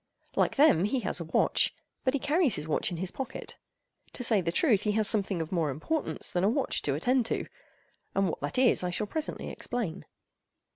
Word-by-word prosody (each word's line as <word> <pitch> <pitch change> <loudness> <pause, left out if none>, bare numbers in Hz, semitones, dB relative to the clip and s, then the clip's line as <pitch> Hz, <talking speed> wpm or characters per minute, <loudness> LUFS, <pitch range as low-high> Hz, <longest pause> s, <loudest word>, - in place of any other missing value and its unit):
Like - - +1
them, 270 - +5
he 245 +5 0
has 190 - -1
a 170 - -5
watch, 160 - +2 0.3
but 260 +1 +1
he - - 0
carries 290 - +2
his 150 +1 -4
watch 155 - 0
in 175 - -5
his 180 +2 -1
pocket. 265 - -7 0.6
To 250 - -4
say 220 -4 +4
the 170 -1 -1
truth, 215 - +3
he 210 - 0
has 215 -1 +3
something 195 -6 +2
of 160 - -11
more 165 -5 0
importance 160 - -3
than 175 - 0
a 200 - +4
watch 265 +3 0
to 140 - -1
attend 245 - +1
to—and 195 - -5
what - - -3
that - - -3
is, 250 -6 +4
I 180 - 0
shall 180 +4 -2
presently 310 +8 -4
explain. 195 -8 -4
210 Hz, 205 wpm, -29 LUFS, 175-260 Hz, 0.6 s, them